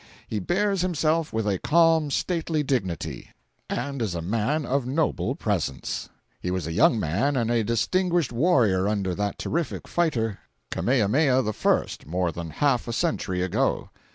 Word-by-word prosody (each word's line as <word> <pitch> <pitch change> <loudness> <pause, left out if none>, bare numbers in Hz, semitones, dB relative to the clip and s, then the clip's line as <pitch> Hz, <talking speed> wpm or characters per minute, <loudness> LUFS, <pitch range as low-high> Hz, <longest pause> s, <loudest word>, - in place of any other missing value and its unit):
He 110 - -2
bears 195 - +1
himself 165 -2 +1
with 110 -1 -1
a 95 -3 0
calm, 165 -2 +4
stately 160 0 -1
dignity, 100 - -2 0.4
and 140 -2 -3
is 100 -6 -1
a 85 - -2
man 115 - 0
of 135 -1 0
noble 150 +4 0
presence. 65 -1 -2 0.3
He 90 - -3
was 90 -3 -2
a 80 - -4
young 110 +6 +4
man 105 - 0
and 120 -2 +1
a 115 -2 +2
distinguished 170 - +1
warrior 115 - +3
under 100 -3 0
that 100 +2 -2
terrific 165 -2 -3
fighter, 115 - 0 0.3
Kamehameha 130 +3 +2
I., 110 - +2 0.2
more 90 +2 0
than 85 0 -6
half 125 - +1
a 120 - -3
century 95 - -1
ago. 95 - 0
120 Hz, 155 wpm, -25 LUFS, 100-155 Hz, 0.4 s, calm